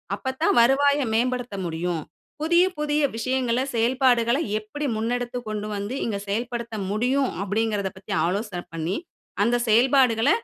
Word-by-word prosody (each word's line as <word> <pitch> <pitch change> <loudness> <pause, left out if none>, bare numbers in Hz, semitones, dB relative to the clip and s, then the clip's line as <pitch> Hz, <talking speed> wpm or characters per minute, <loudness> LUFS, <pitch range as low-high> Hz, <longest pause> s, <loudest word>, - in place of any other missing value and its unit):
அப்ப 260 -1 -4
தான் 330 - +3
வருவாய 280 +4 +4
மேம்படுத்த 245 -1 0
முடியும். 170 0 -2 0.4
புதிய, 340 +3 +4
புதிய 300 0 +1
விஷயங்கள 255 +1 0
செயல்பாடுகள 240 +1 +3 0.2
எப்பிடி 285 +8 -5
முன்னெடுத்து 245 +2 -2
கொண்டுவந்து 210 +2 -4
இங்கு 200 -3 -2
செயல்படுத்த 235 +1 -3 0.2
முடியும்" 255 +5 +1
அப்பிடிங்கிறதப் 205 -2 -1
பத்தி 195 +1 -6
ஆலோசனை 185 0 -2
பண்ணி 165 +4 -2 0.5
அந்த 235 +2 +2
செயல்பாடுகள 245 +1 +4
235 Hz, 120 wpm, -24 LUFS, 210-260 Hz, 0.5 s, வருவாய